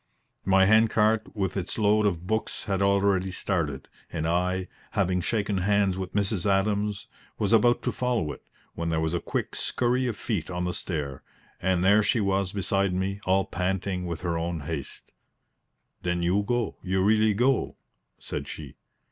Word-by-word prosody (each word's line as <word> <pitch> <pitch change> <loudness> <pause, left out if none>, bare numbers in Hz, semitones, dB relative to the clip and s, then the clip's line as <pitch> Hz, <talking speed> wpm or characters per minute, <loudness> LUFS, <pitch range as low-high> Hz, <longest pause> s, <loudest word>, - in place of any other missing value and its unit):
My 95 0 +5
hand 110 +2 +5
cart 110 0 +2
with 95 -3 -1
its 95 -3 -2
load 105 0 +3
of 90 -3 -2
books 110 +3 -2
had 100 -2 -1
already 100 -1 +2
started, 80 -7 -2 0.2
and 80 0 -2
I, 90 +2 0 0.3
having 90 0 +1
shaken 105 0 0
hands 100 0 +2
with 95 0 -5
Mrs. 100 -2 0
Adams, 100 +1 +1 0.3
was 105 +1 +1
about 120 +2 +4
to - - 0
follow 120 -11 -1
it, - - -10 0.3
when 85 0 -3
there 80 -1 +1
was 80 +1 -1
a 85 - +1
quick - - -3
scurry 125 +1 0
of 115 -4 -3
feet 100 -9 -2
on 90 0 -2
the 90 - -1
stair, 70 -6 -4 0.4
and 95 -1 +1
there 100 +2 +6
she 105 +3 +2
was 100 -2 +1
beside 100 -1 0
me 100 +2 -2
all 95 +1 +3
panting 90 0 -2
with 85 -1 -4
her 85 -2 -1
own 85 -1 -3
haste. 75 -1 -6 0.9
"Then 90 -1 -1
you 90 +4 +2
go 120 +2 -1
you 95 0 0
really 110 +1 +4
go?" 125 +4 +1 0.4
said - - -5
she. 75 -4 -8
95 Hz, 175 wpm, -27 LUFS, 90-105 Hz, 0.9 s, there